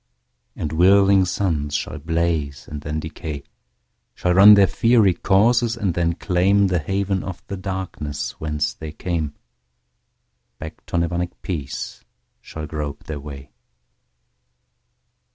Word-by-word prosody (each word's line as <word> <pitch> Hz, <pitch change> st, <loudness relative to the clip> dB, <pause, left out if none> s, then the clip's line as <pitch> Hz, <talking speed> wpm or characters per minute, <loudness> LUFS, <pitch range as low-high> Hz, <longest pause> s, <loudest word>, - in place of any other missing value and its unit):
And 75 Hz, -, -4 dB
whirling 95 Hz, +3 st, +5 dB
suns 80 Hz, -6 st, -1 dB
shall 80 Hz, -, -3 dB
blaze 80 Hz, -4 st, -2 dB
and 75 Hz, -1 st, -7 dB
then 75 Hz, +1 st, -3 dB
decay, 75 Hz, -2 st, -6 dB, 0.7 s
Shall 90 Hz, -, +1 dB
run 100 Hz, +3 st, +9 dB
their 100 Hz, -1 st, +6 dB
fiery 115 Hz, -2 st, +3 dB
courses 115 Hz, +7 st, +2 dB
and 100 Hz, -6 st, -1 dB
then 85 Hz, 0 st, 0 dB
claimThe 90 Hz, 0 st, +2 dB
haven 95 Hz, +2 st, -1 dB
of 95 Hz, -2 st, -7 dB
the 100 Hz, -, -5 dB
darkness 95 Hz, -6 st, -4 dB
whence 75 Hz, -1 st, -2 dB
they 80 Hz, -1 st, -8 dB
came; 80 Hz, -4 st, -3 dB, 1.2 s
Back 80 Hz, 0 st, -9 dB
to -, -, -2 dB
Nirvanic 85 Hz, +1 st, -1 dB
peace 75 Hz, -8 st, -5 dB, 0.4 s
shall 80 Hz, -1 st, -7 dB
grope 75 Hz, -2 st, -5 dB
their 75 Hz, -2 st, -6 dB
way. 70 Hz, -2 st, -10 dB
85 Hz, 120 wpm, -22 LUFS, 75-95 Hz, 1.2 s, run